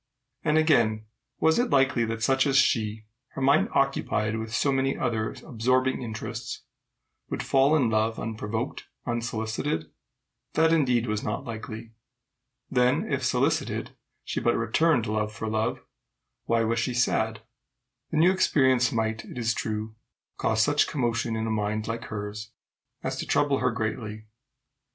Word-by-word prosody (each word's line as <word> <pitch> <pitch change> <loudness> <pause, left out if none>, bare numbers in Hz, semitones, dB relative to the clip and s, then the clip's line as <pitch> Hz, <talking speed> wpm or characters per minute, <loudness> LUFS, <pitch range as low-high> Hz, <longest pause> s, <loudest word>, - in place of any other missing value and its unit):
And 155 -1 +2
again, 115 -9 +3 0.3
was 160 +4 +3
it 245 - +1
likely 135 -3 +3
that 115 0 -3
such 135 +2 +3
as 135 -1 +3
she, 110 -4 +2 0.3
her - - -5
mind 140 +3 +4
occupied 125 -5 +1
with 110 0 -4
so 140 +4 +1
many 135 0 +1
other 110 -4 -1
absorbing 130 0 +1
interests, 110 -3 -5 0.7
would - - -3
fall 135 +3 +4
in 135 -6 +3
love 110 0 +1
unprovoked, 110 +2 -4 0.2
unsolicited? 110 - -2 0.6
That, 160 +1 +4
indeed, 125 -7 +2
was 110 -2 -1
not 105 - -3
likely. 110 -1 -7 0.8
Then 125 -1 +1
if, - - -1
solicited, - - 0 0.3
she - - -3
but 120 - +2
returned 120 +3 +2
love 110 0 -1
for 110 +1 -5
love, 110 0 -1 0.6
why 115 -1 +2
was 115 0 0
she 125 +2 -1
sad? 110 -3 +1 0.7
The 160 - -2
new 170 +4 +6
experience 130 -9 +3
might, 110 -1 -1
it - - -10
is 115 -1 +1
true, 110 0 -3 0.4
cause 110 0 +2
such 145 0 +3
commotion 120 -3 -1
in 110 0 -2
a 110 - -1
mind 105 0 -1
like 115 0 -4
hers 105 0 -6 0.5
as - - -2
to - - -4
trouble 140 -2 +2
her 125 - +2
greatly. 110 -1 -4
115 Hz, 150 wpm, -27 LUFS, 110-135 Hz, 0.8 s, new